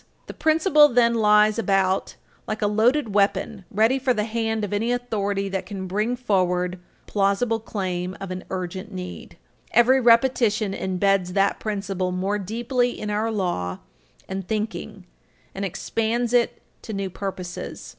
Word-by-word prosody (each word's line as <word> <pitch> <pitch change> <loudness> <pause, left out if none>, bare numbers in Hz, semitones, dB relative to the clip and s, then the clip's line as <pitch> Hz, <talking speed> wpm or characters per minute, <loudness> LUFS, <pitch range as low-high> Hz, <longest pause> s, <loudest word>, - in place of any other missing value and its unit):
The - - -8
principle 310 -1 +5
then 240 -3 +3
lies 210 0 +4
about 195 -2 +1 0.3
like 215 0 -3
a - - +3
loaded 220 +3 +2
weapon, 200 0 +1
ready 225 +6 +2
for 260 -1 +1
the 210 - 0
hand 225 0 -1
of 205 - -6
any 225 +4 0
authority 205 -5 -1
that 190 -1 -3
can 195 -2 -5
bring 210 +6 -1
forward 180 -6 0 0.2
a - - -36
plausible 210 +3 +1
claim 185 -4 -4
of 195 -1 -6
an 185 0 -5
urgent 185 +3 -5
need. 180 -2 -8 0.3
Every 255 +3 +5
repetition 230 -4 +3
imbeds 190 -1 0
that 200 0 +2
principle 195 -3 -2
more 195 +3 -1
deeply 240 +5 -1
in 210 0 -3
our 215 +2 0
law 175 - -2 0.5
and 190 -1 -5
thinking 215 -2 -4 0.5
and 195 - -5
expands 225 +5 -1
it 240 -1 +1 0.2
to 220 - -7
new 195 -1 -3
purposes. 185 -2 -6
210 Hz, 150 wpm, -24 LUFS, 190-230 Hz, 0.5 s, principle